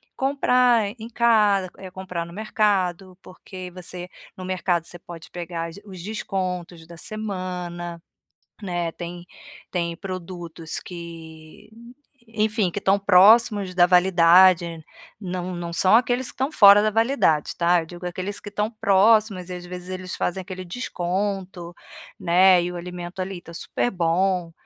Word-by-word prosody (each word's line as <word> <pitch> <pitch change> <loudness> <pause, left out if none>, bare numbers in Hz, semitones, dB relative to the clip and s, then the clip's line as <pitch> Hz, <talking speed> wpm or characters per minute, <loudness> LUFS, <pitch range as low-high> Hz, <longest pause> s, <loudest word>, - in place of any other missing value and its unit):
comprar 250 -5 +2
em 225 +2 -8
casa 215 -5 +3
eh, 190 -1 -9
comprar 180 -3 -5
no 170 - -12
mercado, 195 -4 -1
porque 185 0 -10
você 180 0 -8 0.3
no 185 - -7
mercado 180 -2 -1
você 175 - -11
pode 170 -2 -12
pegar 170 -1 -5
as 165 - -12
os 185 -3 -10
descontos 180 -5 -4
da 170 - -12
semana, 180 -4 -5 0.6
né. 175 -3 -3
Tem 175 0 -8 0.5
tem 170 -2 -2
produtos 175 -4 -6
que, 165 +2 -11 0.6
enfim, 215 -3 0
que - - -9
estão 195 0 +2
próximos 205 +1 +5
da 175 - +6
validade. 180 -1 +5 0.4
Não 180 -2 -4
não 170 -1 -5
são 185 +5 +4
aqueles 245 +1 +2
que - - -7
estão 265 +4 -2
fora 205 -5 +8
da 215 - +1
validade, 225 - +1
tá. 175 0 +3
Eu - - -8
digo 175 +1 -10
aqueles 185 +3 -4
que 205 - -9
estão 210 +1 -2
próximos 205 -2 +3
e, - - -5
às 175 0 -9
vezes, 180 0 -8
eles 185 0 -5
fazem 185 +2 -2
aquele 185 0 -8
desconto, 185 -3 -4 0.5
né. 180 +1 +5
E 175 - -3
o - - -8
alimento 180 +1 -7
ali 185 -1 -5
tá 170 - -13
super 245 - -2
bom, 175 0 0
185 Hz, 150 wpm, -23 LUFS, 175-205 Hz, 0.6 s, fora